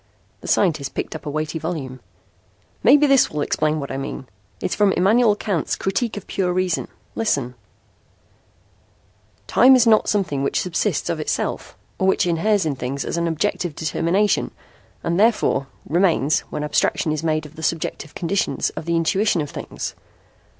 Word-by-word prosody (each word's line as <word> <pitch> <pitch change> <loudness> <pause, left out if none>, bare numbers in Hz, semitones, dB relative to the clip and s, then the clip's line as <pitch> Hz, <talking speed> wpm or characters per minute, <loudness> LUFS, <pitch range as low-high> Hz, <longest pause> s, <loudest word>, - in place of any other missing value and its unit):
The - - -10
scientist 155 -8 +1
picked - - -4
up 160 - -8
a - - -1
weighty 155 +2 -3
volume. 150 -6 -5 0.8
"Maybe 290 +5 +6
this 275 -2 +4
will 150 - -3
explain 155 +1 0
what 140 - -5
I - - -3
mean. 135 0 -5 0.3
It's - - -2
from 205 -2 +3
Immanuel 215 +4 +4
Kant's 200 -7 -2
'Critique 205 +4 -2
of 205 - -7
Pure 180 -2 -1
Reason.' 185 -1 0 0.3
Listen: 140 - -1 1.9
'Time 260 +3 +6
is 245 -2 +4
not 220 -2 +4
something 180 -10 0
which 140 - 0
subsists 180 -2 -1
of - - -3
itself, - - -3 0.2
or 190 - +2
which 190 - +3
inheres 180 +3 +1
in 150 -3 -1
things 130 +2 -4
as - - -3
an 170 0 0
objective 165 -1 -1
determination, 170 +6 +1 0.5
and 170 +2 0
therefore, 210 - +2 0.2
remains, 165 -3 +2
when 150 - -4
abstraction 150 +1 +1
is 155 -1 -2
made 155 -1 0
of 150 +1 -13
the 160 - -9
subjective 155 -1 -3
conditions 185 +3 -1
of - - -7
the 170 0 0
intuition 185 +4 +2
of 145 -2 -3
things. - - -6
170 Hz, 165 wpm, -21 LUFS, 150-200 Hz, 1.9 s, Maybe